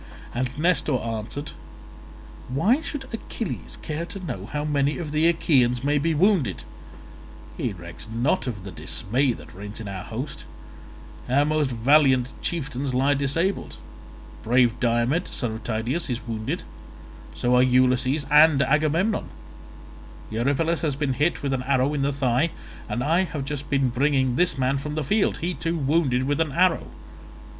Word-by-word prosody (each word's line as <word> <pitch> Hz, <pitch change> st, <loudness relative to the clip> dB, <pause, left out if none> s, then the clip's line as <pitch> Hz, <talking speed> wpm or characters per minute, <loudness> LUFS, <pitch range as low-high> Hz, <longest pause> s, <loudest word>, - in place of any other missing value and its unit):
And 130 Hz, +2 st, -2 dB
Nestor 160 Hz, -3 st, +2 dB
answered, 115 Hz, +6 st, -5 dB, 1.0 s
"Why 205 Hz, -, +2 dB
should 290 Hz, -4 st, -5 dB
Achilles 225 Hz, -2 st, -5 dB
care 155 Hz, +2 st, -3 dB
to 195 Hz, -, -7 dB
know 125 Hz, -, -6 dB
how 150 Hz, +4 st, -3 dB
many 145 Hz, -1 st, +1 dB
of 160 Hz, -4 st, -5 dB
the 155 Hz, +2 st, +3 dB
Achaeans 135 Hz, -8 st, +2 dB
may 145 Hz, +1 st, +2 dB
be 160 Hz, +2 st, 0 dB
wounded? 185 Hz, -, +2 dB, 0.9 s
He 115 Hz, -, -2 dB
recks 85 Hz, +2 st, -9 dB
not 130 Hz, +9 st, 0 dB
of 105 Hz, -6 st, -4 dB
the 100 Hz, -, -7 dB
dismay 125 Hz, -, 0 dB
that -, -, -12 dB
reigns 100 Hz, +3 st, -8 dB
in 110 Hz, -, -6 dB
our 95 Hz, -2 st, -5 dB
host; 130 Hz, +6 st, -6 dB, 0.9 s
our 140 Hz, +3 st, +3 dB
most 155 Hz, -2 st, +1 dB
valiant 130 Hz, +1 st, +4 dB
chieftains 140 Hz, -5 st, -2 dB
lie 135 Hz, +3 st, +3 dB
disabled, 145 Hz, +8 st, -1 dB, 0.7 s
brave 120 Hz, 0 st, +3 dB
Diomed, 120 Hz, +7 st, +1 dB
son 120 Hz, -4 st, -3 dB
of 110 Hz, +1 st, -7 dB
Tydeus, 120 Hz, +9 st, -1 dB
is 120 Hz, -1 st, -4 dB
wounded; 110 Hz, -1 st, -3 dB, 0.7 s
so 125 Hz, +1 st, +2 dB
are 125 Hz, -, +6 dB
Ulysses 130 Hz, +3 st, +3 dB
and 150 Hz, -1 st, +7 dB
Agamemnon; 155 Hz, +9 st, +1 dB, 1.0 s
Eurypylus 140 Hz, +9 st, 0 dB
has 150 Hz, -4 st, 0 dB
been 140 Hz, -2 st, -1 dB
hit 150 Hz, +5 st, 0 dB
with 140 Hz, -1 st, 0 dB
an 130 Hz, -, -1 dB
arrow 135 Hz, +2 st, +1 dB
in 145 Hz, -, -1 dB
the 140 Hz, +1 st, +1 dB
thigh, 135 Hz, +2 st, +1 dB, 0.4 s
and 125 Hz, -, -1 dB
I 170 Hz, +6 st, +2 dB
have 150 Hz, -5 st, -5 dB
just 145 Hz, 0 st, -5 dB
been 135 Hz, -2 st, +2 dB
bringing 130 Hz, 0 st, +1 dB
this 180 Hz, +1 st, +2 dB
man 135 Hz, +1 st, +1 dB
from 150 Hz, +2 st, -5 dB
the 155 Hz, -, -1 dB
field—he 180 Hz, 0 st, 0 dB
too 165 Hz, 0 st, -2 dB
wounded 140 Hz, -3 st, +1 dB
with 145 Hz, +3 st, 0 dB
an 155 Hz, -4 st, -1 dB
arrow. 180 Hz, +2 st, +2 dB
140 Hz, 155 wpm, -24 LUFS, 125-155 Hz, 1.0 s, and